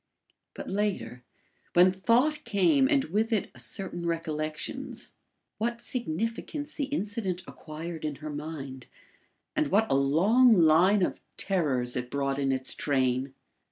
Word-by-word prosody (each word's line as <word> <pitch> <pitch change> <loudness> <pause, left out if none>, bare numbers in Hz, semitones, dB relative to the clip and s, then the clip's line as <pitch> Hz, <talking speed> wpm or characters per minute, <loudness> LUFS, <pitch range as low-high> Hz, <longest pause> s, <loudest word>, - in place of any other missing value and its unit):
But - - -7
later, 185 - -2 0.5
when 180 +1 +6
thought 245 +11 +2
came 265 - +3
and 280 -3 +3
with 215 +7 -1
it 215 -5 0
a 120 - -15
certain 175 - -4
recollections, 155 -2 -4 0.5
what 235 +2 -1
significance 235 - -3
the 290 - -2
incident 205 -8 -3
acquired 160 +1 -8
in 150 -2 -2
her 155 +2 -7
mind, 145 -3 -7 0.7
and 310 0 +2
what 215 +3 +3
a - - +4
long 195 - +5
line 175 +5 +5
of - - -2 0.2
terrors 140 -11 0
it 125 -1 -3
brought 140 0 -1
in 135 -1 +1
its 130 -1 0
train! 130 -1 0
175 Hz, 135 wpm, -28 LUFS, 140-225 Hz, 0.7 s, when